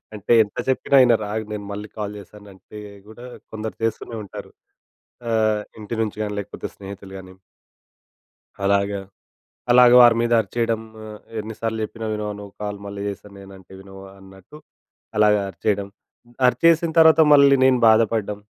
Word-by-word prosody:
అంటే 105 +3 0
ఎంత 105 - -14
చెప్పినా 135 +1 +2
వినరు 120 -4 +3
ఆగు 110 0 -3
నేను 105 -1 -6
మళ్ళీ 105 +1 -6
కాల్ 105 -1 -4
చేస్తానంటే 100 0 -14 0.3
కూడా 110 +3 -12 0.3
కొందరు 110 0 -6
చేస్తూనే 115 +1 -3
ఉంటారు. 95 - -10 0.8
ఆహ్, 110 -2 +1 0.2
ఇంటి 105 +2 -6
నుంచి 105 -1 -5
గానీ, 105 -1 -4
లేకపోతే 100 0 -8
స్నేహితులుగాని. 95 -1 -11 1.3
అలాగా, 100 0 0 0.7
అలాగా 125 0 +7
వారి 120 -1 +6
మీద 120 - -1
అరిచేయడం 115 +1 -2 0.3
ఆహ్, 105 -1 -10 0.2
ఎన్ని 110 +1 -8
సార్లు 110 -1 -3
చెప్పినా 115 +1 -7
వినవా 105 -1 -4
నువ్వు 100 -1 -11
కాల్ 105 -1 -5
మళ్ళీ 100 0 -7
చేస్తానంటే 100 -2 -11
వినవా 95 0 -13
అన్నట్టు, 95 +7 -16 0.6
అలాగా 105 -1 +4
అరిచేయడం. 100 0 -2 0.6
అరిచేసిన 165 +5 +3
తర్వాత 160 0 +6
మళ్ళీ 140 -1 +6
నేను 130 -1 +4
బాధపడ్డం, 110 -2 +1
105 Hz, 135 wpm, -21 LUFS, 100-115 Hz, 1.3 s, అలాగా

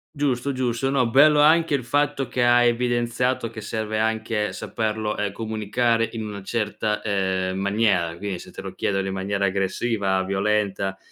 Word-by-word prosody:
Giusto, 140 -2 0
giusto. 130 0 -1
No, 130 -3 +2
bello 145 +4 +6
anche 160 0 +4
il 130 - -2
fatto 145 +1 0
che 125 +1 0
hai 120 0 +5
evidenziato 120 0 0
che 110 -1 -8
serve 110 0 -3
anche 110 -1 -1
saperlo, 110 +2 -3
ehm, 105 -1 -2
comunicare 115 +2 0
in 110 -2 -4
una 105 -1 -6
certa, 105 0 -2
uhm, 95 -2 -1
maniera. 100 -4 +1
Quindi, 95 -1 -4
se - - -11
te - - -8
lo - - -7
chiedono 95 -1 -1
in 95 - -3
maniera 100 +1 -1
aggressiva, 95 0 0
violenta, 100 0 -1
110 Hz, 160 wpm, -23 LUFS, 100-120 Hz, -, bello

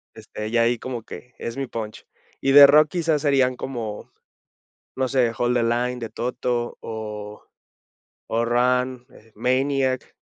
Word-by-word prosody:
este, 105 0 -7
ya 115 0 +3
ahí 120 +1 +2
como 125 -1 -5
que 125 +2 -11
es 115 - -5
mi 135 0 -3
punch. 110 -3 -7 0.3
Y 135 - +2
de 140 0 +11
rock, 150 +2 +5
quizás, 165 -4 0
serían 135 -4 +2
como, 115 -5 -6 0.9
no 130 0 0
sé, 125 -3 +2
"Hold 120 0 +1
the 120 - +2
line" 120 +2 0
de 115 -2 -5
Toto 120 0 -3
o 105 -2 -7 0.9
o 115 +1 0
"Run", 125 +1 +1
eh, 115 - -19
"Maniac", 130 +2 0
125 Hz, 150 wpm, -23 LUFS, 115-130 Hz, 0.9 s, de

